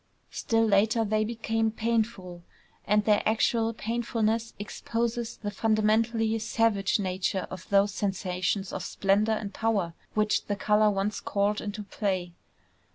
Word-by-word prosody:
Still 225 0 +1
later 220 +2 +3
they 215 +1 +1
became 225 0 -1
painful; 220 -6 -2 0.5
and 210 0 +3
their 210 -1 +4
actual 225 +1 +2
painfulness 230 0 -1
exposes 230 +3 -3
the 205 -1 -4
fundamentally 220 +2 +1
savage 220 -2 +1
nature 190 -1 -1
of 185 -1 -9
those 200 0 +3
sensations 190 -1 -2
of - - -3
splendor 200 +4 +1
and 205 -2 -4
power 205 -7 0 0.2
which 215 0 +1
the 205 - -1
color 210 +1 +3
once 200 +1 -1
called 205 +1 0
into 210 0 -5
play. 190 -3 -2
215 Hz, 130 wpm, -28 LUFS, 200-225 Hz, 0.5 s, their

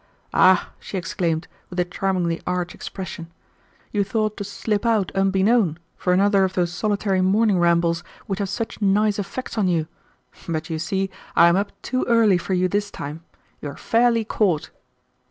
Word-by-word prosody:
"Ah!" 185 0 +4
she 195 - -6
exclaimed, 170 -2 -2 0.2
with 180 - -5
a 180 - +2
charmingly 180 -2 -1
arch 180 -1 -1
expression, 170 -3 -7 0.6
"you 205 -1 +1
thought 215 +1 -1
to 205 - -5
slip 205 +1 -2
out 220 -5 +1
unbeknown 195 -2 +2 0.2
for 180 - -1
another 195 +1 +4
of 190 0 0
those 175 -2 0
solitary 200 -1 0
morning 200 +1 +3
rambles 170 -1 +2 0.2
which 195 0 -3
have 200 -2 -1
such 225 +2 -4
nice 205 +1 +2
effects 210 +4 -4
on 200 - +2
you. 165 -3 +1 0.6
But 160 0 -3
you 160 - -2
see 190 +3 -1 0.2
I 170 - +7
am 170 - +3
up 200 +2 -2
too 255 - -1
early 220 -6 +5
for 185 +2 -2
you 185 0 +2
this 205 +2 -1
time. 155 -2 -7 0.4
You 145 - -4
are 140 - -9
fairly 230 -1 +2
caught." 190 -8 0
190 Hz, 170 wpm, -23 LUFS, 175-205 Hz, 0.6 s, I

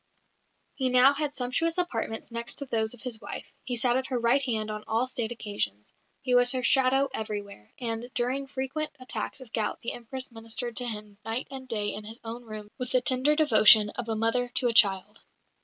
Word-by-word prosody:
He 260 -2 0
now 255 +2 +6
had 290 0 -3
sumptuous 300 +7 0
apartments 230 -10 -3
next 235 +1 -1
to 280 - -5
those 225 -2 -1
of 230 - -16
his 240 -3 -4
wife; 200 - -7 0.2
he 245 - -2
sat 240 +1 +4
at 260 - -3
her 255 - -2
right 240 +4 +2
hand 220 -5 -2
on 215 0 -6
all 225 +3 +1
State 240 -3 -2
occasions; 205 - -4 0.3
he 255 -2 0
was 245 0 +7
her 255 -1 -1
shadow 270 +1 +5
everywhere; 205 - -6
and 235 0 -4
during 260 +3 -1
his - - -22
frequent 275 +3 -3
attacks 255 +1 -4
of 245 -4 -14
gout 215 -2 -2
the 235 - -4
Empress 255 +2 -6
ministered 230 +1 -6
to 250 - -2
him 210 -2 -7
night 225 +4 -4
and 265 -1 -8
day 210 -3 -2
in 210 - -6
his 225 +3 -9
own 235 +1 -8
rooms 215 -1 -9
with 250 0 -4
the 255 - +3
tender 260 +4 +2
devotion 215 -8 +6
of 240 -2 -5
a 225 - -1
mother 230 +3 0
to 255 - +3
a - - -1
child. 200 -2 +4
240 Hz, 210 wpm, -27 LUFS, 220-260 Hz, 0.3 s, was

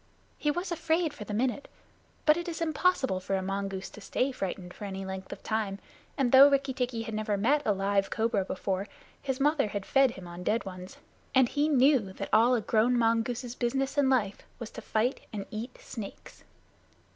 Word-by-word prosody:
He 300 - +1
was 350 +4 -2
afraid 325 -1 0
for 210 - -8
the 210 - -5
minute, 260 +4 -1 0.6
but 305 - +6
it 345 +1 -4
is 330 - -5
impossible 315 - +1
for 190 +1 -2
a 190 - -1
mongoose 195 0 -3
to 215 - -12
stay 255 +6 0
frightened 185 -6 -5
for 205 - -8
any 195 -1 -5
length 190 0 -6
of - - -8
time, 215 -3 -1 0.4
and 265 -4 +2
though 270 +2 +9
Rikki 275 -1 +1
tikki 245 -3 -2
had 225 - -6
never 215 -1 -1
met 275 +9 +3
a - - +5
live 195 0 +1
cobra 220 -3 +1
before, 190 +1 -3 0.3
his 265 -1 -2
mother 290 -3 +3
had 205 -1 -4
fed 270 -1 +4
him 190 -6 -9
on 175 +1 -8
dead 215 +5 0
ones, 185 0 -8 0.4
and 260 -2 +6
he 295 +1 +1
knew 260 -8 +4
that - - -5
all 235 +4 +6
a 235 - 0
grown 225 +3 +2
mongoose's 230 +1 0
business 265 +2 -1
in 285 -2 +3
life 215 -7 +1 0.2
was 235 -3 -7
to - - -8
fight 230 +4 0
and 200 -2 -5
eat 230 +4 -6
snakes. 215 -5 -9
230 Hz, 200 wpm, -29 LUFS, 200-270 Hz, 0.6 s, though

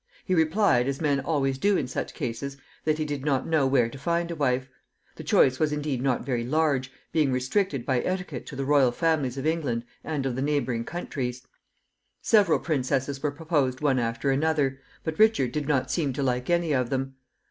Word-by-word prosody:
He 185 - 0
replied, 160 - +3
as 140 0 -2
men 145 -3 +1
always 135 -3 0
do 200 +3 +3
in 135 - -1
such 125 - -4
cases, 135 +4 -4 0.3
that 155 -1 +2
he 155 - -1
did 145 -2 -4
not 135 -3 +1
know 155 -4 +2
where 130 -3 +3
to 135 +4 -10
find 170 +3 -1
a - - -3
wife. 130 -3 0 0.5
The - - -8
choice 130 0 +3
was 155 -1 +2
indeed 150 -4 -2
not 130 -2 0
very 120 -3 -1
large, 135 -1 +1 0.2
being 150 -4 +2
restricted 130 - 0
by 130 -2 +1
etiquette 180 -8 -4
to - - -7
the 135 0 -3
royal 140 -3 +4
families 145 -3 0
of 135 - -4
England 145 -8 -1 0.2
and 150 -4 -2
of 130 -2 -1
the 130 - -2
neighboring 135 -5 0
countries. 130 -7 -4 0.8
Several 205 -9 +4
princesses 135 -1 -1
were 150 - +1
proposed 145 -4 -1
one 135 -3 +2
after 115 +3 0
another, 140 -2 +1 0.2
but 160 +2 -4
Richard 215 - +4
did 150 +1 -3
not 130 -3 +1
seem 140 -2 0
to 140 - -2
like 125 +1 -1
any 170 -2 +2
of 125 -3 +1
them. 135 0 -3
140 Hz, 200 wpm, -26 LUFS, 130-155 Hz, 0.8 s, royal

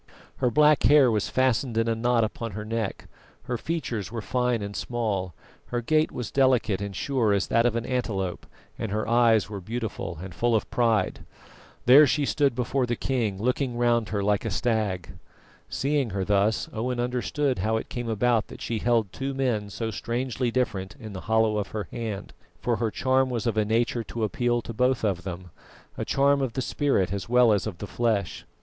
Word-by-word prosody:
Her 125 - +2
black 150 +3 +4
hair 140 -4 +6
was 105 -2 0
fastened 130 -2 +1
in 115 0 +2
a 115 - +2
knot 115 +1 +2
upon 110 0 -4
her 105 +2 -5
neck, 110 -2 -3 0.4
her 125 -1 -3
features 120 - -3
were 115 - -4
fine 125 -3 0
and 100 0 -6
small, 100 -8 -2 0.3
her 120 - -2
gait 155 +6 +2
was 125 -4 -5
delicate 125 -7 +2
and 100 -1 -5
sure 120 -1 +1
as 100 -1 +1
that 115 +1 +3
of 120 - -1
an 115 0 -2
antelope, 100 -8 -2 0.3
and 110 - -3
her 105 +1 -1
eyes 115 -3 +4
were 100 -2 -6
beautiful 110 -5 -4
and 95 0 -8
full 115 +7 +1
of 110 - 0
pride. 115 -5 +1 0.6
There 140 +4 +8
she 140 +3 +1
stood 140 -3 +1
before 125 +1 0
the 120 - 0
king, 115 -6 -1
looking 125 +2 -1
round 120 -2 +2
her 100 -2 -1
like 105 0 +1
a 115 - -2
stag. 105 -6 -1 0.5
Seeing 140 0 0
her 95 -1 -2
thus, 105 +2 +2
Owen 120 +3 -2
understood 125 +1 -1
how 110 +4 +1
it - - -5
came 120 -1 -4
about 115 +1 +1
that - - -11
she 115 -2 -2
held 115 -4 +1
two 135 0 -3
men 120 -6 0
so 110 +2 -4
strangely 120 +3 -2
different 110 -6 -2
in 110 -4 -8
the 95 - -6
hollow 110 -1 +3
of 100 - -3
her 100 -5 -4
hand, 110 -4 -5 0.3
for 120 -2 0
her 115 0 0
charm 130 +3 +1
was 120 -2 -2
of 115 -3 0
a 110 -1 +2
nature 115 +2 0
to 115 +1 -4
appeal 120 +2 0
to 115 - -6
both 125 +2 +1
of 95 -5 0
them 90 -2 -7 0.4
a - - -3
charm 140 0 +3
of 130 -4 -1
the 130 - -2
spirit 100 -12 0
as 100 +2 -4
well 125 -2 +5
as 100 +1 0
of 100 -5 -5
the 105 - -6
flesh. 105 -4 -1
115 Hz, 200 wpm, -26 LUFS, 105-125 Hz, 0.6 s, There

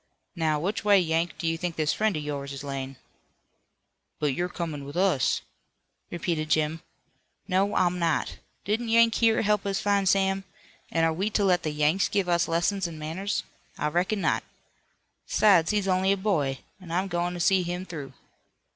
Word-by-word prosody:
"Now, 155 -3 +1
which 195 +8 -2
way, 205 -1 +6
Yank, 165 0 0
do - - -5
you 165 0 0
think 175 -1 -3
this 155 -1 +1
friend 215 -5 0
of 150 - -4
yours 140 -1 -4
is 140 +1 -7
layin'?" 135 -1 -5 1.2
"But 150 -2 +1
you're 175 +6 -2
comin' 160 -5 -5
with 140 +4 -7
us," 180 - +2 0.7
repeated 165 -2 -2
Jim. 155 +1 +1 0.7
"No, 195 +2 +1
I'm 180 0 +2
not. 165 -3 -1 0.3
Didn't 225 +3 -1
Yank 230 0 +5
here 225 -1 +3
help 210 -1 +2
us 200 0 -1
find 200 -2 +2
Sam? 195 0 +2 0.5
An' 165 - +1
are 165 0 +3
we 195 +6 -1
to 210 -1 +1
let 180 -2 +3
the 155 - -2
Yanks 150 +5 +1
give 200 -3 0
us 170 -1 +2
lessons 175 +3 0
in 165 -2 -8
manners? 175 +6 -3 0.3
I 150 - 0
reckon 185 +6 0
not. - - +1 0.8
'Sides, 185 -6 +4
he's 205 -2 0
only 190 +1 +2
a 200 - +2
boy, 155 -10 0 0.2
an' 185 -3 -13
I'm 180 +4 0
goin' 175 0 -2
to - - -6
see 190 +2 +3
him 180 +1 -4
through." 145 -7 -7
175 Hz, 180 wpm, -27 LUFS, 155-195 Hz, 1.2 s, way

